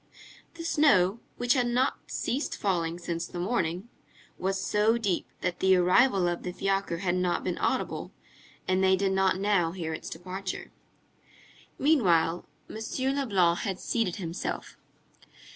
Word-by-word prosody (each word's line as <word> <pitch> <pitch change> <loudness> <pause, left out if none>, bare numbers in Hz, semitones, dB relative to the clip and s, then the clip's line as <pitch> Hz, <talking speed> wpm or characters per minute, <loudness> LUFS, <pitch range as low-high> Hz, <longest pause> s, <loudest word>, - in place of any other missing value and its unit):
The 335 - -7
snow, 235 - +3 0.2
which 245 0 +2
had 250 -3 +1
not 250 +2 +1
ceased 275 +5 -2
falling 170 -4 -1
since 170 -1 -4
the - - -8
morning, 180 0 -1 0.5
was 190 +1 -1
so 210 +4 +2
deep 205 -6 -1
that 175 - -2
the 190 0 +5
arrival 180 +2 +4
of 175 0 -2
the 180 - -4
fiacre 195 -2 -1
had 180 -3 +1
not 180 -1 0
been - - -2
audible, - - -1 0.6
and 185 0 +2
they 190 0 +5
did 195 0 0
not 190 -1 +2
now 195 -5 +2
hear 165 -4 -4
its - - -6
departure. 185 +3 -6 1.1
Meanwhile, 180 - +2 0.2
M. 220 - -7 0.4
Leblanc 190 -11 +2
had 195 -3 -3
seated 225 -7 -1
himself. 170 -2 -5
190 Hz, 145 wpm, -28 LUFS, 175-215 Hz, 1.1 s, the